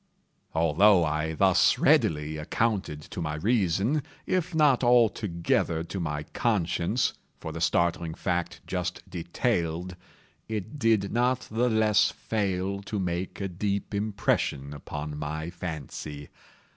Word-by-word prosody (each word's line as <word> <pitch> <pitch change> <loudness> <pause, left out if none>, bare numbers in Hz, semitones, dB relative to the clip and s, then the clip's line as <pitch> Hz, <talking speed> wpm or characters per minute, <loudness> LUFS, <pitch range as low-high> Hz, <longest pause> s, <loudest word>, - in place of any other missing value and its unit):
Although 85 +4 +5
I 75 +1 -1
thus 95 +1 +4
readily 75 0 +3
accounted 95 -1 -1
to 85 - -7
my 75 -2 -2
reason, 105 - +1 0.2
if 180 -2 -1
not 145 -5 +4
altogether 105 -9 +2
to 85 +3 -5
my 75 -3 -2
conscience, 100 +2 0 0.3
for - - -6
the - - -6
startling 85 -1 +1
fact 90 -2 -2
just 90 +1 -4
detailed, 90 -1 -2 0.5
it 110 +5 -5
did 110 -5 +2
not 125 +2 +2
the 120 +3 +2
less 110 -2 +4
fail 100 -2 -2
to 100 +2 -4
make 90 -1 -3
a 100 - -2
deep 100 +3 -2
impression 100 -9 0
upon 75 +1 -6
my 80 +3 -4
fancy. 75 -4 -6
90 Hz, 120 wpm, -27 LUFS, 80-110 Hz, 0.5 s, Although